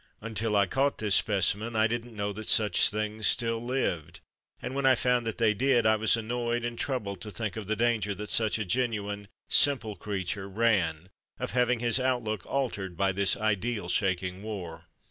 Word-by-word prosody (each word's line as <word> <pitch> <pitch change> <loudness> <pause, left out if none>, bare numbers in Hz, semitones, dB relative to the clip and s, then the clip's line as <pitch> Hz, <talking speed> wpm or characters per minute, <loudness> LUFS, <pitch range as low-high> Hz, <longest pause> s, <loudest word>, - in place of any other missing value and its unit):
Until 110 0 -2
I 100 -1 +5
caught 135 +8 0
this 105 -3 0
specimen, 105 +3 +1
I 110 0 +4
didn't 120 +1 -3
know 100 0 -2
that 110 +1 -6
such 105 -2 +4
things 105 0 -2
still 115 -1 +1
lived, 120 - -2 0.4
and - - -5
when 140 +1 -2
I 130 - +6
found 125 -1 +1
that 115 - -3
they 110 -2 +3
did, 125 +1 +2
I 110 0 +5
was 110 +1 +2
annoyed 120 +1 -2
and 120 0 -3
troubled 115 - -3
to 110 - -6
think 105 -2 -4
of 110 -3 -6
the 110 - 0
danger 110 -3 0
that 105 +2 -6
such 110 -1 +2
a 110 - -3
genuine, 105 -2 -1 0.2
simple 125 -7 +3
creature 95 -1 -4
ran, 95 -6 +1 0.3
of - - -4
having 125 -1 +1
his 120 +1 +2
outlook 120 -7 -1
altered 105 -10 -2
by 95 +1 +2
this 100 +1 +2
ideal 110 -1 -1
shaking 90 0 -1
war. 90 -6 -7
110 Hz, 185 wpm, -28 LUFS, 100-120 Hz, 0.4 s, I